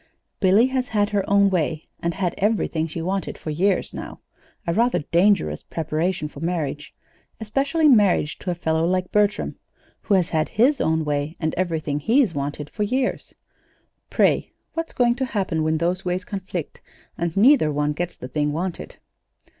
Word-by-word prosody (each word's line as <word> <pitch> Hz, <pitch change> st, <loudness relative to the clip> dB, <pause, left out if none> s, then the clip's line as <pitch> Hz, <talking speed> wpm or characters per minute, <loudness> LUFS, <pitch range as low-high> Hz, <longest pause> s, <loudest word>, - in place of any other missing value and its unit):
"Billy 200 Hz, +4 st, +5 dB
has 260 Hz, -1 st, -1 dB
had 205 Hz, -1 st, 0 dB
her 200 Hz, -2 st, +1 dB
own 200 Hz, 0 st, +4 dB
way, 160 Hz, -3 st, -1 dB
and 170 Hz, -1 st, -2 dB
had 180 Hz, -3 st, -1 dB
everything 195 Hz, -6 st, 0 dB
she 165 Hz, +1 st, -5 dB
wanted 190 Hz, +2 st, -2 dB
for 155 Hz, -, -5 dB
years 185 Hz, +5 st, +1 dB
now -, -, -7 dB, 0.5 s
a 170 Hz, -, 0 dB
rather 235 Hz, +5 st, +2 dB
dangerous 185 Hz, +7 st, +2 dB
preparation 160 Hz, +1 st, -2 dB
for 150 Hz, -, -11 dB
marriage, 155 Hz, -3 st, -3 dB, 0.5 s
especially 275 Hz, +8 st, +1 dB
marriage 205 Hz, -, +3 dB
to -, -, -5 dB
a 175 Hz, -, 0 dB
fellow 160 Hz, -1 st, 0 dB
like 180 Hz, +1 st, 0 dB
Bertram 210 Hz, 0 st, +1 dB, 0.4 s
who 205 Hz, -, +2 dB
has 180 Hz, -3 st, +2 dB
had 155 Hz, -1 st, 0 dB
his 260 Hz, +6 st, +3 dB
own 160 Hz, 0 st, +1 dB
way 145 Hz, +2 st, -2 dB
and 160 Hz, -1 st, -1 dB
everything 160 Hz, -5 st, -1 dB
he's 230 Hz, -, +3 dB
wanted 145 Hz, 0 st, -4 dB
for 210 Hz, -, -7 dB
years. 255 Hz, +5 st, -1 dB, 0.7 s
Pray, -, -, +2 dB, 0.2 s
what's 330 Hz, 0 st, -3 dB
going 240 Hz, -1 st, +3 dB
to 265 Hz, +2 st, -2 dB
happen 180 Hz, -5 st, 0 dB
when 155 Hz, 0 st, +1 dB
those 175 Hz, +3 st, -1 dB
ways 180 Hz, +1 st, -2 dB
conflict, 190 Hz, -7 st, -5 dB, 0.3 s
and 170 Hz, +1 st, -3 dB
neither 235 Hz, -, +5 dB
one 150 Hz, 0 st, 0 dB
gets 175 Hz, +3 st, -4 dB
the 125 Hz, -, -7 dB
thing 145 Hz, +3 st, -1 dB
wanted? 175 Hz, +3 st, -4 dB
180 Hz, 170 wpm, -23 LUFS, 160-210 Hz, 0.7 s, Billy